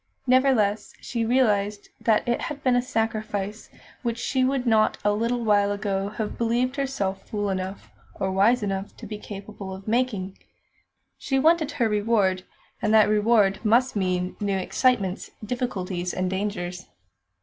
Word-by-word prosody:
Nevertheless, 250 Hz, -5 st, +2 dB
she 235 Hz, -2 st, -3 dB
realised 210 Hz, -5 st, +1 dB
that 220 Hz, 0 st, +2 dB
it 240 Hz, -, +1 dB
had 295 Hz, -2 st, -5 dB
been 255 Hz, -2 st, +3 dB
a 245 Hz, -, +3 dB
sacrifice 215 Hz, -3 st, -3 dB, 0.3 s
which 235 Hz, -2 st, -2 dB
she 260 Hz, +1 st, 0 dB
would 260 Hz, -1 st, +1 dB
not 220 Hz, -2 st, +3 dB
a 205 Hz, -, +4 dB
little 235 Hz, +3 st, 0 dB
while 205 Hz, -2 st, +3 dB
ago 200 Hz, -1 st, -2 dB
have 215 Hz, 0 st, -5 dB
believed 240 Hz, +3 st, +1 dB
herself 200 Hz, -9 st, -3 dB
fool 205 Hz, -2 st, -1 dB
enough, 190 Hz, +1 st, -5 dB, 0.2 s
or 190 Hz, -, -2 dB
wise 210 Hz, +5 st, +3 dB
enough, 195 Hz, 0 st, -3 dB
to -, -, -9 dB
be 210 Hz, -1 st, -6 dB
capable 200 Hz, -2 st, -8 dB
of 195 Hz, +2 st, -12 dB
making. 215 Hz, -5 st, -1 dB, 0.8 s
She 270 Hz, -, -1 dB
wanted 315 Hz, +1 st, +3 dB
her 240 Hz, -5 st, +1 dB
reward, 205 Hz, -3 st, +1 dB, 0.4 s
and 215 Hz, -, +1 dB
that 215 Hz, -1 st, +6 dB
reward 210 Hz, -2 st, +3 dB
must 235 Hz, +4 st, +3 dB
mean 185 Hz, -2 st, -1 dB
new 200 Hz, -2 st, 0 dB
excitements, 195 Hz, 0 st, 0 dB, 0.2 s
difficulties, 190 Hz, -7 st, -3 dB
and 185 Hz, 0 st, -1 dB
dangers. 185 Hz, -2 st, -3 dB
210 Hz, 150 wpm, -25 LUFS, 195-240 Hz, 0.8 s, that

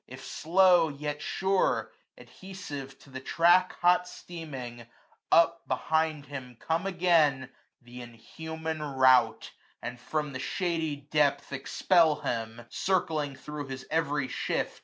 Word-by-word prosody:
If 130 Hz, +1 st, -10 dB
slow, 175 Hz, 0 st, +4 dB
yet 145 Hz, +1 st, -5 dB
sure, 190 Hz, 0 st, 0 dB, 0.3 s
adhesive 145 Hz, -8 st, -9 dB
to 140 Hz, -, -17 dB
the 130 Hz, -, -6 dB
track 175 Hz, +6 st, +3 dB
Hot 180 Hz, 0 st, +4 dB
steaming, 135 Hz, -10 st, -8 dB, 0.4 s
up 170 Hz, 0 st, +4 dB
behind 155 Hz, +2 st, 0 dB
him 130 Hz, -3 st, -8 dB
come 165 Hz, +4 st, -1 dB
again 160 Hz, -8 st, +2 dB, 0.3 s
Th' 125 Hz, +1 st, -10 dB
inhuman 160 Hz, +7 st, -6 dB
rout, 130 Hz, -3 st, +3 dB, 0.3 s
and 125 Hz, 0 st, -6 dB
from 150 Hz, +3 st, -3 dB
the 130 Hz, -, -5 dB
shady 165 Hz, 0 st, -1 dB
depth 145 Hz, -1 st, 0 dB
Expel 160 Hz, +3 st, +2 dB
him, 115 Hz, 0 st, -4 dB
circling 155 Hz, -6 st, -1 dB
thro* 145 Hz, +2 st, -7 dB
his 130 Hz, 0 st, -7 dB
every 145 Hz, -4 st, 0 dB
shift. -, -, -2 dB
150 Hz, 120 wpm, -29 LUFS, 130-165 Hz, 0.4 s, slow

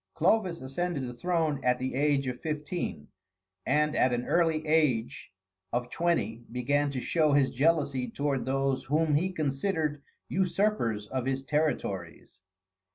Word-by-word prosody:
Clovis 185 Hz, 0 st, +2 dB
ascended 145 Hz, +4 st, -2 dB
the 125 Hz, -1 st, -5 dB
throne 155 Hz, -1 st, -1 dB
at 125 Hz, 0 st, +3 dB
the 130 Hz, +1 st, -3 dB
age 140 Hz, 0 st, +2 dB
of 125 Hz, -1 st, -4 dB
fifteen, 150 Hz, -, -4 dB, 0.6 s
and 150 Hz, +3 st, +2 dB
at 130 Hz, -, +4 dB
the 120 Hz, 0 st, -1 dB
early 165 Hz, -2 st, +2 dB
age 150 Hz, -7 st, +1 dB, 0.4 s
of 120 Hz, 0 st, -2 dB
twenty 165 Hz, -9 st, 0 dB
began 145 Hz, +4 st, +1 dB
to 135 Hz, -2 st, -3 dB
show 155 Hz, +2 st, +2 dB
his 140 Hz, -2 st, +3 dB
jealousy 140 Hz, -3 st, +1 dB
toward 140 Hz, +1 st, -1 dB
those 135 Hz, 0 st, 0 dB
whom 155 Hz, +3 st, +1 dB
he 175 Hz, +6 st, +2 dB
considered 155 Hz, -1 st, -1 dB, 0.3 s
usurpers 185 Hz, -, 0 dB
of 130 Hz, +3 st, -3 dB
his 135 Hz, 0 st, -1 dB
territories. 100 Hz, -, -2 dB
145 Hz, 140 wpm, -29 LUFS, 130-160 Hz, 0.6 s, at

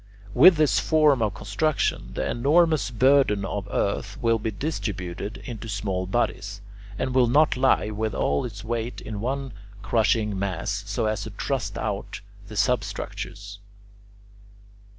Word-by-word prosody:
With 170 Hz, -, +8 dB
this 155 Hz, -2 st, +3 dB
form 150 Hz, -5 st, +3 dB
of 105 Hz, -3 st, 0 dB
construction, 105 Hz, +9 st, -1 dB
the -, -, -1 dB
enormous 155 Hz, +5 st, +3 dB
burden 125 Hz, -4 st, +3 dB
of 100 Hz, 0 st, -4 dB
earth 100 Hz, +5 st, -2 dB
will 115 Hz, -3 st, +2 dB
be 110 Hz, -, -2 dB
distributed 100 Hz, -, -4 dB
into 115 Hz, -3 st, -7 dB
small 95 Hz, -2 st, -2 dB
bodies, 100 Hz, -2 st, -1 dB, 0.4 s
and 130 Hz, -, -2 dB
will 130 Hz, -2 st, +4 dB
not 150 Hz, +6 st, +4 dB
lie 130 Hz, -4 st, +2 dB
with 110 Hz, -1 st, -2 dB
all 70 Hz, -, +1 dB
its 105 Hz, -4 st, -7 dB
weight 115 Hz, +1 st, -3 dB
in 105 Hz, -2 st, -6 dB
one 135 Hz, +2 st, -2 dB, 0.3 s
crushing 110 Hz, -3 st, +1 dB
mass 100 Hz, +2 st, -2 dB
so 100 Hz, +2 st, -1 dB
as 110 Hz, -2 st, -1 dB
to -, -, -5 dB
thrust -, -, -3 dB
out -, -, -4 dB, 0.3 s
the -, -, -8 dB
substructures. 100 Hz, 0 st, -2 dB
110 Hz, 140 wpm, -25 LUFS, 100-130 Hz, 0.4 s, With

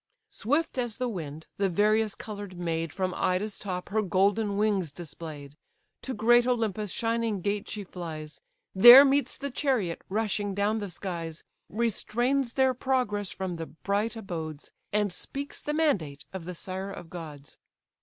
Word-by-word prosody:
Swift 290 Hz, +3 st, 0 dB
as 240 Hz, -3 st, -2 dB
the 255 Hz, -1 st, -1 dB
wind, 160 Hz, -8 st, -6 dB
the 195 Hz, -1 st, +2 dB
various 210 Hz, +3 st, +2 dB
colour'd 205 Hz, -4 st, -7 dB
maid 165 Hz, -2 st, -2 dB
From 185 Hz, +1 st, -2 dB
Ida's 195 Hz, +3 st, 0 dB
top 180 Hz, -3 st, -4 dB
her 215 Hz, +2 st, +1 dB
golden 200 Hz, +2 st, +2 dB
wings 200 Hz, -7 st, +1 dB
display'd; 150 Hz, -2 st, -9 dB, 0.5 s
To 260 Hz, -, -4 dB
great 240 Hz, +3 st, +5 dB
Olympus' 220 Hz, -4 st, 0 dB
shining 230 Hz, -2 st, 0 dB
gate 205 Hz, +2 st, -2 dB
she 210 Hz, -, -4 dB
flies, 160 Hz, -5 st, -7 dB, 0.3 s
There 240 Hz, +8 st, +11 dB
meets 280 Hz, +1 st, +1 dB
the 280 Hz, -1 st, -4 dB
chariot 245 Hz, -, 0 dB
rushing 205 Hz, -1 st, -1 dB
down 205 Hz, +2 st, +1 dB
the 205 Hz, -2 st, -4 dB
skies, 170 Hz, -3 st, -5 dB, 0.3 s
Restrains 235 Hz, +3 st, 0 dB
their 265 Hz, -1 st, +3 dB
progress 245 Hz, -6 st, 0 dB
from 185 Hz, -3 st, -4 dB
the 165 Hz, -1 st, -5 dB
bright 200 Hz, +7 st, -2 dB
abodes, 160 Hz, -8 st, -6 dB, 0.2 s
And 205 Hz, -2 st, +1 dB
speaks 280 Hz, +9 st, -5 dB
the 295 Hz, -, -3 dB
mandate 195 Hz, -, 0 dB
of 185 Hz, -3 st, -6 dB
the 180 Hz, 0 st, -6 dB
sire 190 Hz, +3 st, -5 dB
of 175 Hz, -4 st, -9 dB
gods. 150 Hz, -5 st, -9 dB
205 Hz, 155 wpm, -28 LUFS, 175-230 Hz, 0.5 s, There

